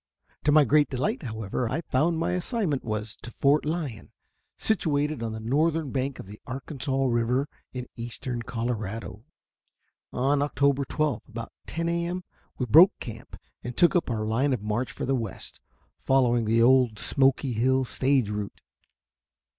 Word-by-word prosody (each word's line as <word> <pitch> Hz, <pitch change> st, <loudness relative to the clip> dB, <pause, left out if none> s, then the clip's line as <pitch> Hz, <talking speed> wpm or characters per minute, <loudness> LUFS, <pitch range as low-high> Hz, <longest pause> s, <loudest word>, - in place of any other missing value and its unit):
To 150 Hz, -, +4 dB
my 150 Hz, 0 st, +7 dB
great 150 Hz, +3 st, +4 dB
delight, 130 Hz, 0 st, -1 dB
however, 110 Hz, 0 st, -3 dB
I 150 Hz, +7 st, -1 dB
found 160 Hz, +3 st, +1 dB
that 160 Hz, -, -2 dB
my -, -, 0 dB
assignment 180 Hz, -, -1 dB
was 110 Hz, -1 st, -4 dB
to -, -, -9 dB
Fort 140 Hz, +5 st, +2 dB
Lyon, 150 Hz, -8 st, -4 dB, 0.5 s
situated 150 Hz, -, 0 dB
on 115 Hz, -1 st, -2 dB
the 110 Hz, -, -5 dB
northern 150 Hz, +5 st, +1 dB
bank 135 Hz, 0 st, -2 dB
of -, -, -8 dB
the 105 Hz, +2 st, -12 dB
Arkansas 135 Hz, 0 st, -2 dB
River 125 Hz, +3 st, +1 dB, 0.2 s
in 125 Hz, -1 st, -5 dB
eastern 120 Hz, +1 st, -5 dB
Colorado. 115 Hz, -2 st, -4 dB, 0.9 s
On 140 Hz, +3 st, +1 dB
October 140 Hz, -1 st, +1 dB
12 150 Hz, -4 st, -1 dB
about 115 Hz, 0 st, -7 dB, 0.2 s
10 165 Hz, +1 st, -2 dB
A. 170 Hz, 0 st, 0 dB
M., 180 Hz, +1 st, -4 dB, 0.3 s
we 125 Hz, -, -1 dB
broke 165 Hz, -, +7 dB
camp 115 Hz, -2 st, -8 dB, 0.3 s
and 120 Hz, 0 st, -6 dB
took 175 Hz, +2 st, +5 dB
up 175 Hz, -, +1 dB
our 110 Hz, -2 st, -1 dB
line 130 Hz, +6 st, +1 dB
of 115 Hz, -5 st, -3 dB
march 110 Hz, +4 st, -1 dB
for -, -, -5 dB
the 135 Hz, -, +1 dB
west, 115 Hz, -6 st, -5 dB, 0.4 s
following 120 Hz, -3 st, +2 dB
the 115 Hz, +2 st, +3 dB
old 125 Hz, -3 st, +4 dB
Smoky 135 Hz, +1 st, +1 dB
Hill 130 Hz, +3 st, +2 dB
stage 130 Hz, -3 st, +1 dB
route. 105 Hz, -1 st, -5 dB
130 Hz, 160 wpm, -27 LUFS, 115-145 Hz, 0.9 s, my